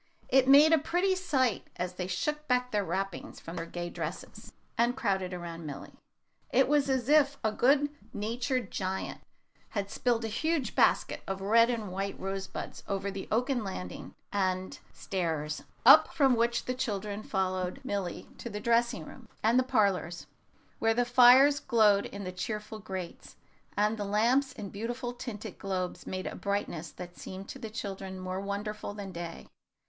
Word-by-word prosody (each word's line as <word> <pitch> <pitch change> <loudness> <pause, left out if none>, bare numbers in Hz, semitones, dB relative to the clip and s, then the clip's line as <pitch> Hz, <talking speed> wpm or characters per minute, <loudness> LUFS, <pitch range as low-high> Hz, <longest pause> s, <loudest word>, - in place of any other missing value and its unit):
It 260 0 +5
made 290 +4 +8
a 320 - +6
pretty 355 +6 +1
sight 265 - 0
as 180 0 -3
they 180 0 -4
shook 300 +12 -2
back 250 0 +1
their 210 -1 +1
wrappings 190 +1 -4
from 165 - -8
their 165 - -4
gay 175 0 -5
dresses, - - -6 0.2
and 240 +2 +2
crowded 190 -7 0
around 170 -2 -6
Milly. 140 - -7 0.6
It 265 - +4
was 285 -1 +3
as 260 -3 +1
if 285 -1 +4
a 220 - +2
good 275 +6 +4 0.2
natured 245 +3 -2
giant 190 0 -3 0.6
had 200 0 -2
spilled 235 -2 +1
a - - -1
huge 285 +5 -1
basket - - +3
of 195 0 -3
red 230 +4 +5
and 220 -5 -2
white 195 +1 -3
rose 195 0 -3
buds - - -7
over 200 0 -2
the 195 -1 -6
oaken 245 +1 +1
landing 90 - -6 0.2
and 185 -2 -1
stairs, 160 -5 -2 0.2
up - - +10
which 235 -4 +3
the 255 - -1
children 210 -5 -3
followed 185 +1 -1
Milly 200 -8 -3
to 235 - -5
the 210 -1 -5
dressing 235 -7 +1
room - - -13
and 230 +3 +5
the - - +3
parlors, 200 -9 +1 0.5
where 225 0 +2
the 245 +1 +2
fires 255 +4 +7
glowed 210 -4 +4
in 200 0 -7
the 185 - -4
cheerful 210 +3 -5
grates, 190 -4 -7 0.4
and 210 +1 +2
the 205 - -2
lamps 240 +7 +2
in 210 -5 -7
beautiful 240 +4 -4
tinted 220 -4 -7
globes 185 -2 -3
made 185 0 -4
a - - -3
brightness 200 -5 -2
that 175 -1 -9
seemed 190 +1 -8
to 270 - -7
the 225 -3 -6
children 195 -3 -5
more 185 0 -3
wonderful 205 +1 -4
than 200 -2 -6
day. 170 -1 -7
210 Hz, 170 wpm, -30 LUFS, 190-245 Hz, 0.6 s, up